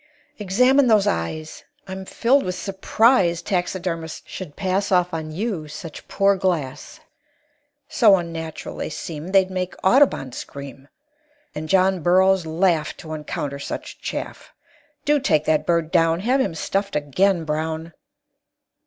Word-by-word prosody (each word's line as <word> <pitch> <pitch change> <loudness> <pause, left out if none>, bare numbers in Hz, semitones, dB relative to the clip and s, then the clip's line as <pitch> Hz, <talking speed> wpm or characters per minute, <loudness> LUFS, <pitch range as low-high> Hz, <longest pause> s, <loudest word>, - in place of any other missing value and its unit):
"Examine 250 +7 +4
those 215 -4 +4
eyes. 120 - -3 0.2
I'm 190 0 -6
filled 260 +8 +2
with 180 -5 -3
surprise 195 -2 +2
Taxidermists 175 -3 -3
should 175 -6 -8
pass 195 +1 -1
Off 180 -1 +2
on 160 -1 -4
you 180 -3 -3
such 155 +1 -9
poor 200 0 +3
glass; 170 - -2 0.9
So 215 -6 +5
unnatural 165 -3 -5
they - - -3
seem 155 +1 -6
They'd 190 0 +3
make 185 -1 -3
Audubon 240 - +3
scream, 140 +1 -9 0.7
And 155 +1 -6
John 190 -1 +3
Burroughs 185 +1 +3
laugh 165 -1 +1
To 155 -1 -8
encounter 145 -2 -4
such - - -7
chaff. - - -6 0.5
Do 295 0 +3
take 155 - +1
that 155 -1 +1
bird 170 -2 +1
down; 165 -1 +3
Have 255 +6 +2
him 165 - -1
stuffed 195 +3 -2
again, 165 +5 +1
Brown!" 160 +1 -3
180 Hz, 135 wpm, -22 LUFS, 155-195 Hz, 0.9 s, So